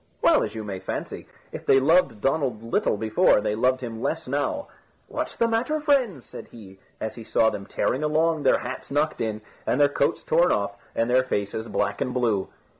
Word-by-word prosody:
Well, - - +5
as - - -3
you 110 - -4
may 100 -3 -5
fancy, 95 - -5 0.2
if - - -7
they 135 - +5
loved 140 - +3
Donald 135 -6 0
little 115 -2 0
before, 110 0 +3
they 105 0 -1
loved 130 +4 +1
him 115 -2 -6
less 160 +2 -2
now. 145 - -2 0.4
"What's - - -4
the 230 - +2
matter, 240 +7 0
friends?" 260 - +1
said - - -10
he, 95 -4 -14 0.2
as 110 - -4
he 115 - -9
saw 110 0 +2
them 100 0 -7
tearing 130 - -1
along, 160 +1 +1
their 135 - +4
hats 125 +2 -6
knocked 150 +2 0
in, 110 -1 -2 0.3
and 130 - +1
their 145 0 +5
coats 140 - 0
torn 170 +3 +3
off, 100 0 -1 0.2
and 115 - +1
their 130 +1 +3
faces 110 -2 -3
black 105 - -1
and 125 - -2
blue. 115 -6 +1
125 Hz, 200 wpm, -25 LUFS, 110-155 Hz, 0.4 s, Well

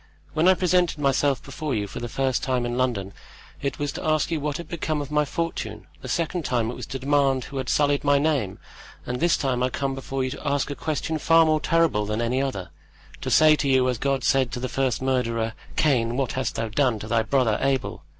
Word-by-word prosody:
"When 160 +3 +2
I 185 - +7
presented 180 -2 +2
myself 140 -1 +1
before 145 0 -4
you 105 -2 -1
for 100 - -7
the 120 - -5
first 130 +2 0
time 130 -2 0
in 120 0 -2
London, 115 -7 -1 0.5
it 140 -2 -2
was 145 -1 -2
to - - -7
ask 155 0 +1
you 160 - 0
what 145 0 -2
had 170 - -8
become 155 -2 -2
of 145 0 -5
my 150 0 +2
fortune; 145 -9 -4 0.2
the - - -7
second 165 +5 -1
time 120 -4 0
it - - -7
was - - -7
to 135 - -4
demand 135 -1 +2
who 140 - -8
had 130 -2 -3
sullied 145 -1 +2
my 145 -1 +4
name; 140 -10 0 0.5
and 125 0 -3
this 170 0 +3
time 130 -3 -1
I 125 - +2
come 135 +1 -2
before 135 0 -3
you 130 - -2
to - - -6
ask 140 0 0
a - - -4
question 155 +1 -2
far 165 +2 +5
more 155 -1 +2
terrible 165 -13 +2
than 105 +1 -2
any 120 +3 0
other, 95 -10 -3 0.5
to - - -3
say 155 -1 +6
to 140 - -1
you 130 -1 +4
as 125 -3 -2
God 135 -2 0
said 130 -3 +2
to - - -3
the 130 - -2
first 130 -1 -1
murderer: 115 -4 0 0.2
'Cain, 120 -6 +2
what 135 -3 0
hast 130 0 -2
thou 115 - -1
done 125 0 +1
to 105 - -7
thy 115 0 +2
brother 120 -3 +1
Abel? 135 -1 -1
135 Hz, 235 wpm, -24 LUFS, 125-150 Hz, 0.5 s, I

